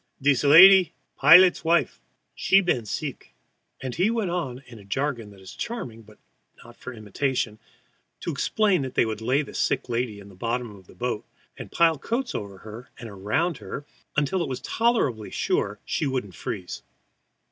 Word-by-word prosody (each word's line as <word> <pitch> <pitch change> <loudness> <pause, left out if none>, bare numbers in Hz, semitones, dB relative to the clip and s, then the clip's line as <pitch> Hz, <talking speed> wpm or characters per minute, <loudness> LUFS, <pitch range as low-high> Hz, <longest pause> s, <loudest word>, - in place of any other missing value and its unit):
"Dees 140 0 +2
lady, 180 +5 +8 0.2
pilot's 175 +6 +7
wife. 170 +1 +1 0.3
She 195 - +4
been 150 - -1
seek." - - -6 0.5
And 130 -2 -4
he 185 - +1
went 225 -6 -1
on 135 -7 -4
in 120 -3 -13
a - - -14
jargon 120 +1 -3
that 100 -1 -16
is 95 0 -12
charming, 175 - -6
but 110 -1 -18 0.5
not 120 0 -14
for 125 - -9
imitation, 110 0 -3 0.6
to 170 - -3
explain 195 +4 +1
that 130 -1 -6
they - - +3
would 110 -1 -4
lay 130 +6 +1
the - - -11
sick - - -1
lady 115 -3 -2
in 100 - -13
the 100 - -14
bottom 115 +4 -3
of 95 -2 -17
the - - -17
boat 120 -3 -3 0.3
and - - -10
pile 165 -3 +3
coats 245 - -3
over 100 -2 -6
her 110 +5 -11
and 115 -2 -9
around 110 - -1
her 145 - -7 0.3
until 150 +6 +1
it 165 - -2
was 130 - -4
tolerably 185 - 0
sure - - -1
she 145 - -1
couldn't 125 -7 -3
freeze. 90 +1 -6
130 Hz, 180 wpm, -25 LUFS, 110-170 Hz, 0.6 s, lady